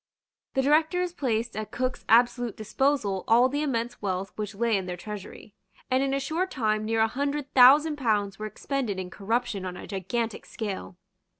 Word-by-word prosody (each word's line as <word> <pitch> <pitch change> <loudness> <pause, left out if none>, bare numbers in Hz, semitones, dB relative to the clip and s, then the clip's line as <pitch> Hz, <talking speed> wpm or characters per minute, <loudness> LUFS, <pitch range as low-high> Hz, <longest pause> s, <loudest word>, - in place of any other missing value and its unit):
The 265 - +2
Directors 325 +5 +2
placed 235 - -1
at 215 0 -4
Cook's 255 0 -3
absolute 240 0 +3
disposal 220 -3 0
all 240 +3 +6
the 290 +2 -1
immense 240 -5 -2
wealth 190 -1 -3
which 210 -1 -5
lay 230 +1 +1
in 190 -2 -2
their 180 -1 -4
treasury; 210 +1 -9 0.4
and 260 +1 +3
in 275 0 0
a 275 - +1
short 325 +7 -1
time 215 -6 0
near 225 0 +1
a 220 - +4
hundred 280 +3 -3
thousand 290 +4 +7
pounds 210 -6 0
were 215 - -3
expended 230 -1 -3
in 185 -1 -5
corruption 225 -1 -2
on 180 -1 -5
a - - -8
gigantic 220 +4 -3
scale. 195 -4 -5
230 Hz, 180 wpm, -27 LUFS, 205-270 Hz, 0.4 s, thousand